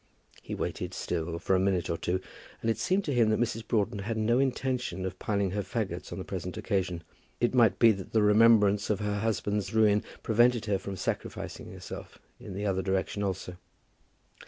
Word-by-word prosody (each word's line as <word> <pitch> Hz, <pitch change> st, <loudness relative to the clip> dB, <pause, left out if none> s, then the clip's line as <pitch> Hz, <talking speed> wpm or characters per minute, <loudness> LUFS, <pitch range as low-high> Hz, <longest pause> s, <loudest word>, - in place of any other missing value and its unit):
He -, -, -5 dB
waited -, -, -4 dB
still 85 Hz, +1 st, -2 dB
for 95 Hz, +2 st, +1 dB
a -, -, +3 dB
minute 95 Hz, -3 st, +1 dB
or 85 Hz, -, -1 dB
two, 90 Hz, +2 st, -1 dB, 0.4 s
and 115 Hz, -, +1 dB
it -, -, -3 dB
seemed 190 Hz, +2 st, +1 dB
to 145 Hz, -, -1 dB
him 115 Hz, -3 st, +4 dB
that 110 Hz, -, +2 dB
Mrs. 115 Hz, -1 st, -1 dB
Broughton 105 Hz, -1 st, 0 dB
had 110 Hz, +3 st, -3 dB
no 115 Hz, +3 st, +2 dB
intention 125 Hz, -8 st, -1 dB
of 95 Hz, 0 st, -5 dB
piling 100 Hz, -3 st, 0 dB
her 105 Hz, +2 st, -1 dB
fagots 100 Hz, +1 st, -4 dB
on -, -, -5 dB
the -, -, -4 dB
present -, -, -5 dB
occasion. 90 Hz, -4 st, -1 dB, 0.4 s
It 120 Hz, -, +2 dB
might 120 Hz, -3 st, +4 dB
be 115 Hz, -1 st, +7 dB
that 95 Hz, -3 st, -5 dB
the 110 Hz, -2 st, +3 dB
remembrance 105 Hz, -1 st, +5 dB
of 105 Hz, -2 st, +1 dB
her 105 Hz, -1 st, -1 dB
husband's 105 Hz, -1 st, -1 dB
ruin 105 Hz, -2 st, +4 dB, 0.2 s
prevented 120 Hz, +1 st, +3 dB
her 100 Hz, -3 st, +1 dB
from 100 Hz, 0 st, -6 dB
sacrificing -, -, -4 dB
herself -, -, -9 dB, 0.2 s
in -, -, -8 dB
the 100 Hz, +2 st, -3 dB
other 95 Hz, -2 st, +1 dB
direction 95 Hz, +2 st, -1 dB
also. 95 Hz, -2 st, -3 dB
105 Hz, 195 wpm, -29 LUFS, 95-115 Hz, 0.4 s, be